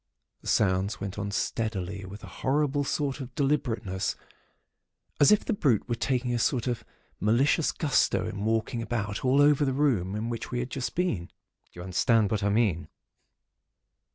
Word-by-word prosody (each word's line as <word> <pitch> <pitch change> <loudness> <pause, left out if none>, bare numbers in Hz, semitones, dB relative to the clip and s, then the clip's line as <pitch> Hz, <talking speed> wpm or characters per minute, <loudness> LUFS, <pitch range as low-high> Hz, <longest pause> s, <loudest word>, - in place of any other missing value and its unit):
The - - -12
sounds 100 +3 +1
went 100 +1 -5
on 100 0 -2
steadily 100 -3 -2
with 100 +2 -10
a - - -11
horrible 145 +1 +1
sort 140 0 -1
of 125 -1 -8
deliberateness; 120 -9 -1 1.0
as 145 - +6
if 210 - +4
the - - 0
brute 130 - +1
were 120 - -1
taking 125 +1 -1
a 120 - 0
sort 120 0 +1
of 120 -3 -2 0.4
malicious 125 - +3
gusto 100 - +1
in 100 0 -5
walking 110 +1 0
about 105 -3 -3
all 130 +2 +3
over 145 0 +4
the 135 -2 +1
room 120 -10 +1
in 110 +2 -2
which 115 -2 -4
we 125 - -3
had 125 +1 -3
just 130 -2 -3
been. 170 - 0
Do - - -32 0.4
you 90 - -8
understand 105 +3 +2
just 110 -2 0
what 100 - +1
I - - +1
mean? 100 -8 +1
115 Hz, 180 wpm, -28 LUFS, 100-135 Hz, 1.0 s, as